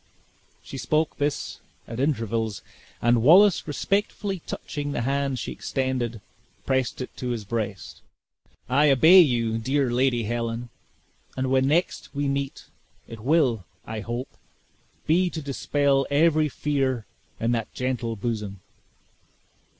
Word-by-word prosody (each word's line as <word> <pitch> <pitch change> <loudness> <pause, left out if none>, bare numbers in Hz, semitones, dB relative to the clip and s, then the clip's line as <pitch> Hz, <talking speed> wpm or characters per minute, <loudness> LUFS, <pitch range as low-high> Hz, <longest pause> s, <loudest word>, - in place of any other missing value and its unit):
She 135 - -8
spoke 155 +2 0
this 145 0 -2 0.3
at 115 +1 -6
intervals, 115 -6 -1 0.4
and 120 0 +4
Wallace 180 - +6
respectfully 195 +4 -1
touching 145 -1 -4
the - - -1
hand 135 +1 0
she - - -4
extended, 125 -4 -2 0.4
pressed 130 -1 0
it 125 - -7
to 125 - -3
his 115 -4 -3
breast. 105 -2 -4 0.7
"I 145 +4 +4
obey 160 +8 +8
you, 115 -8 +3
dear 135 +2 0
Lady 120 -1 +2
Helen, 115 +1 -3 0.7
and 130 0 -1
when 130 0 +3
next 160 0 0
we 145 0 0
meet, 140 0 -3 0.4
it 115 - -9
will, 130 - +2 0.2
I 110 0 -5
hope, 120 +5 -5 0.7
be 180 +3 +3
to 165 - -5
dispel 140 -1 +1
every 155 +1 +3
fear 135 -5 -1 0.3
in 115 +1 +1
that 115 -2 -2
gentle 125 -3 -2
bosom." 105 -3 -4
130 Hz, 125 wpm, -25 LUFS, 115-145 Hz, 0.7 s, obey